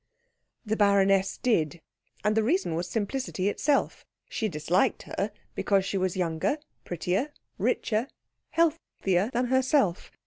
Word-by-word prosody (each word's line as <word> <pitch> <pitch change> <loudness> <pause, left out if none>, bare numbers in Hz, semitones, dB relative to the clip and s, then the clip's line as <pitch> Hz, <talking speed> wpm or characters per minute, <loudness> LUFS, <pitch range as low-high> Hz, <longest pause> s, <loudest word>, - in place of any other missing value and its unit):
The 220 0 0
baroness 195 -2 +3
did; 170 - +1 0.4
and 210 +1 +2
the 220 - +4
reason 285 - +1
was 170 +2 -2
simplicity 215 -3 -1
itself. 285 +6 0 0.2
She 220 - -2
disliked 165 +3 +1
her - - -3 0.2
because 195 -2 +1
she 195 - -1
was 185 0 -1
younger, 170 - 0 0.3
prettier, 180 - -1 0.3
richer, 220 +3 0 0.4
healthier 265 - +1
than 245 +1 +1
herself. 260 - +2
200 Hz, 125 wpm, -28 LUFS, 180-250 Hz, 0.4 s, the